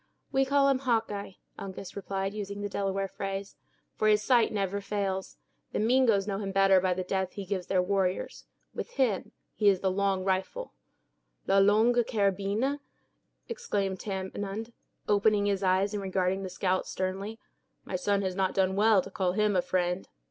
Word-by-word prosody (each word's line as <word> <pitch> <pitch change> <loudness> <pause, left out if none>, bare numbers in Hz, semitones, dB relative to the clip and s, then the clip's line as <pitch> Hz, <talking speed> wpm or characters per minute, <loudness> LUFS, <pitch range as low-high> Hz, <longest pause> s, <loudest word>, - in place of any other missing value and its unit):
"We 270 0 +3
call 280 +1 +3
him 270 -2 +3
Hawkeye," 225 -6 -1 0.3
Uncas 195 -1 -7
replied, 195 0 -3
using 200 -1 -5
the 205 - -3
Delaware 195 0 -1
phrase; 195 0 -5 0.4
"for 215 - 0
his 210 0 +4
sight 240 -2 +4
never 200 -1 -1
fails. 195 -2 -3 0.4
The - - 0
Mingoes 225 -3 +3
know 195 -1 -2
him 195 -2 -3
better 195 -1 +5
by 185 -1 +1
the 185 - -2
death 190 0 -2
he 200 - -6
gives 185 -1 -3
their 185 -2 +2
warriors; 190 -1 -1 0.3
with 485 - -6
them 235 -8 +1 0.2
he 210 -1 +4
is 190 -2 +2
'The 190 - +1
Long 195 0 0
Rifle'." 190 - -2 0.7
"La 195 0 +4
Longue 220 +5 +4
Carabine!" 205 +6 0 0.7
exclaimed 200 - -2
Tamenund, 200 +3 -4 0.3
opening 205 0 +3
his 200 -1 0
eyes, 190 +2 +2
and 205 - -2
regarding 190 0 0
the 190 - -4
scout 185 0 -1
sternly. 195 +4 -3 0.5
"My - - -4
son 200 +2 +1
has 185 -1 -2
not 190 -1 0
done 190 0 +2
well 210 -2 +4
to - - -10
call 185 -2 0
him 205 -2 +2
friend." 180 0 -1
195 Hz, 170 wpm, -29 LUFS, 190-210 Hz, 0.7 s, better